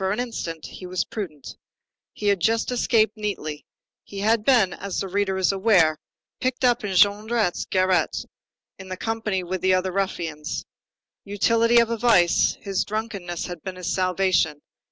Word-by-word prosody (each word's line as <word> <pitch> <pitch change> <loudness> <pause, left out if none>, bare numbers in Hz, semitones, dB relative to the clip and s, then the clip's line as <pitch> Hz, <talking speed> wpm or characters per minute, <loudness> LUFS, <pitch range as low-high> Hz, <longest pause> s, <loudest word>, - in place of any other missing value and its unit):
Nevertheless, 190 +2 0
for 245 - 0
an - - -6
instant, 165 -8 -6
he 185 - -9
was 180 0 -1
prudent. 160 - -7 0.5
He 210 - -8
had 200 -2 +3
just 225 +7 +1
escaped 225 -3 +2
neatly. 155 -8 -4 0.4
He 200 -1 -7
had 220 +1 +2
been, 220 -7 +4
as 200 -1 -4
the 195 - -2
reader 195 0 -1
is 190 0 +2
aware, 190 -6 +3 0.4
picked 255 0 -1
up 245 -3 +2
in 195 -2 -3
Jondrette's 205 +1 +2
garret 185 -1 +1 0.5
in 190 -1 -10
company 215 -2 -2
with 180 0 -4
the 185 0 +3
other 185 0 -1
ruffians. 170 -5 -3 0.6
Utility 230 +4 +2
of 235 -1 +4
a 230 - -1
vice: 210 -7 +3
his 195 -2 -1
drunkenness 200 -5 -4
had 175 -3 -7
been 190 +2 -6
his 180 -1 -3
salvation. 185 -5 +1
195 Hz, 165 wpm, -24 LUFS, 180-220 Hz, 0.6 s, been